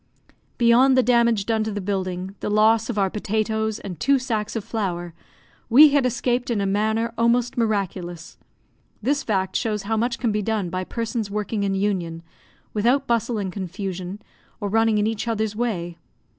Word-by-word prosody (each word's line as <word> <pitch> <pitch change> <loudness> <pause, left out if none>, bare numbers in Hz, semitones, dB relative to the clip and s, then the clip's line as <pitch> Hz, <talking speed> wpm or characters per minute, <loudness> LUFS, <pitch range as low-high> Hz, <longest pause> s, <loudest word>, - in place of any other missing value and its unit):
Beyond 250 +3 +5
the 255 - +5
damage 235 -4 +3
done 220 -1 +1
to 220 - -3
the 205 - -3
building, 185 -1 -3
the - - -3
loss 220 +2 +3
of 235 - -3
our 195 -2 +1
potatoes 220 +1 -1
and 180 -8 -8
two 275 - +3
sacks 225 -5 -3
of 225 - -2
flour, 175 -6 -3 0.6
we 290 +6 +9
had 280 -3 +3
escaped 245 +1 -1
in 230 -3 0
a 200 - 0
manner 220 +3 0
almost 235 +1 +2
miraculous. 190 -7 -2 0.6
This 280 +4 +1
fact 190 -3 -1
shows 215 -4 -1
how 220 +2 -1
much 235 +1 0
can 235 -3 0
be 210 0 0
done 210 -4 -1
by 185 +1 -3
persons 230 -1 -3
working 210 +1 -2
in 195 -1 0
union, 180 -5 -2 0.5
without 245 +6 +2
bustle 235 -1 0
and 190 -3 -3
confusion, 190 0 -5 0.4
or 205 - -3
running 225 +1 +3
in 210 - +2
each 220 +1 -2
other's 220 -2 -1
way. 180 -8 -3
215 Hz, 175 wpm, -23 LUFS, 195-235 Hz, 0.6 s, we